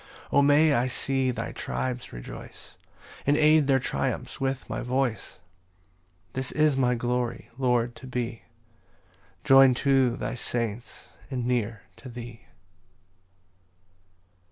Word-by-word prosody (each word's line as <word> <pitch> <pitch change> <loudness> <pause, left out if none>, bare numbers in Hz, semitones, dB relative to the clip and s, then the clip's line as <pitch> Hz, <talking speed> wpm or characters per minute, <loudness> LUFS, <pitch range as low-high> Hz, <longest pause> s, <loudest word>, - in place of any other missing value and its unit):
4 140 - +4
O - - +6
may 145 +2 +5
I 125 -1 +2
see 135 0 0
thy 125 - -3
tribes 125 -1 -4
rejoice, - - -10 0.5
And 145 +1 +4
aid 155 -1 +5
their 135 -2 +4
triumphs 130 - -3
with 135 0 -2
my - - -4
voice! 125 -6 -2 1.0
This 130 0 -3
is 155 -2 +3
my 125 -2 +2
glory, 120 0 -2
Lord, 120 -2 +1
to 130 - -10
be 120 -2 -3 1.0
Join'd 135 -2 +7
to 135 -4 +3
thy - - -3
saints, 120 -2 -4 0.2
and 125 -3 -3
near 115 -3 -1
to 130 - -10
thee. 120 -1 -9
125 Hz, 125 wpm, -27 LUFS, 120-135 Hz, 1.0 s, Join'd